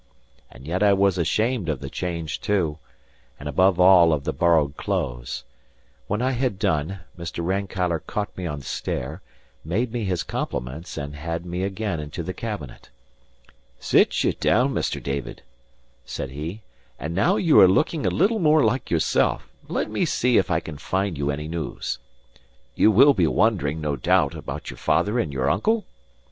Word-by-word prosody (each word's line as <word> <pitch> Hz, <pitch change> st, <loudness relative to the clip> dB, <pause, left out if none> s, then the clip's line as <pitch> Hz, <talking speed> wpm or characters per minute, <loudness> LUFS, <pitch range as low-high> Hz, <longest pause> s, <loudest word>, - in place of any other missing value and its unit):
And 65 Hz, -, -14 dB
yet 90 Hz, +5 st, -2 dB
I 105 Hz, -1 st, +5 dB
was 100 Hz, -2 st, +2 dB
ashamed 110 Hz, +2 st, 0 dB
of 75 Hz, -4 st, -1 dB
the -, -, -6 dB
change 85 Hz, -3 st, -4 dB
too, 85 Hz, -7 st, 0 dB, 0.6 s
and, 75 Hz, -, -7 dB
above 90 Hz, +4 st, +3 dB
all, 90 Hz, -3 st, +7 dB
of 70 Hz, -3 st, -1 dB
the -, -, -2 dB
borrowed 80 Hz, -5 st, +2 dB
clothes. -, -, -3 dB, 0.6 s
When 105 Hz, +4 st, -1 dB
I 130 Hz, -, +2 dB
had 125 Hz, -5 st, -1 dB
done, 80 Hz, +3 st, -1 dB
Mr. 85 Hz, -1 st, -5 dB
Rankeillor 95 Hz, -2 st, -1 dB
caught 105 Hz, -1 st, -3 dB
me 90 Hz, -2 st, -4 dB
on 75 Hz, -2 st, -4 dB
the -, -, -15 dB
stair, 75 Hz, +9 st, -4 dB, 0.4 s
made 110 Hz, +9 st, -1 dB
me 120 Hz, -2 st, -2 dB
his 90 Hz, -4 st, -1 dB
compliments, 75 Hz, +9 st, -5 dB
and 70 Hz, 0 st, -5 dB
had 85 Hz, +3 st, -4 dB
me 90 Hz, +1 st, -3 dB
again 100 Hz, -2 st, -2 dB
into 75 Hz, +3 st, -5 dB
the 95 Hz, -, -4 dB
cabinet. 105 Hz, -, -7 dB, 0.9 s
"Sit -, -, +3 dB
ye -, -, +3 dB
down, 130 Hz, +4 st, +2 dB
Mr. -, -, -1 dB
David," 70 Hz, -1 st, -4 dB, 0.6 s
said 65 Hz, -, -5 dB
he, 80 Hz, +10 st, -6 dB, 0.4 s
"and 80 Hz, +2 st, -4 dB
now 100 Hz, -, +3 dB
that -, -, -1 dB
you 165 Hz, -4 st, +6 dB
are 95 Hz, -, +9 dB
looking 150 Hz, -, +1 dB
a -, -, +2 dB
little 215 Hz, +6 st, +2 dB
more 155 Hz, -3 st, +4 dB
like 115 Hz, +4 st, 0 dB
yourself, 85 Hz, -2 st, +1 dB, 0.2 s
let -, -, -1 dB
me -, -, 0 dB
see 125 Hz, 0 st, +3 dB
if -, -, -1 dB
I 80 Hz, -3 st, +2 dB
can 80 Hz, -3 st, -9 dB
find 95 Hz, +1 st, -1 dB
you 70 Hz, 0 st, -2 dB
any 75 Hz, +1 st, -3 dB
news. 80 Hz, 0 st, -4 dB, 0.7 s
You -, -, +4 dB
will 135 Hz, +7 st, +7 dB
be 90 Hz, -8 st, +2 dB
wondering, 80 Hz, -8 st, +1 dB
no 75 Hz, -2 st, -1 dB
doubt, 60 Hz, -, +2 dB
about -, -, -6 dB
your -, -, -11 dB
father 105 Hz, +4 st, +1 dB
and 80 Hz, -10 st, -1 dB
your 65 Hz, -1 st, -1 dB
uncle? 220 Hz, -, +1 dB
90 Hz, 180 wpm, -24 LUFS, 75-105 Hz, 0.9 s, are